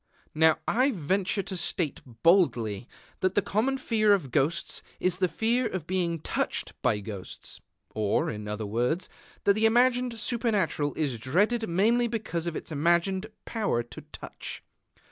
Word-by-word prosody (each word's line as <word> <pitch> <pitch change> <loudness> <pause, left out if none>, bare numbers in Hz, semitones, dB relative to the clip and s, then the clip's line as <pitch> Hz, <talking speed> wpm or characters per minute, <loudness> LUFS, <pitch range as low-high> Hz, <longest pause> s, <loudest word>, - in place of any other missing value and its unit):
Now 160 0 +4
I 255 +4 +3
venture 190 - 0
to 190 - -5
state 170 -3 -1 0.2
boldly 125 - +3 0.3
that 185 0 0
the 205 - +4
common 245 +9 0
fear 215 -5 +3
of 170 -10 0
ghosts 160 +7 +1 0.2
is 180 -1 +1
the 185 0 +2
fear 230 +6 +1
of 185 -7 -4
being 175 -2 0
touched - - -2
by 105 - +1
ghosts, 100 -3 -7 0.3
or, 105 -2 +1
in 105 -1 -6
other 105 +1 -3
words, 125 - -1 0.3
that 200 - +5
the 220 +2 +3
imagined 245 +1 +3
Supernatural 210 - 0
is 140 -7 -1
dreaded 205 - +1
mainly 225 +8 +3
because 215 -7 -3
of 170 - -2
its - - -6
imagined 170 +6 +1 0.2
power 205 - 0
to 120 - -10
touch. - - -7
185 Hz, 150 wpm, -28 LUFS, 145-220 Hz, 0.3 s, that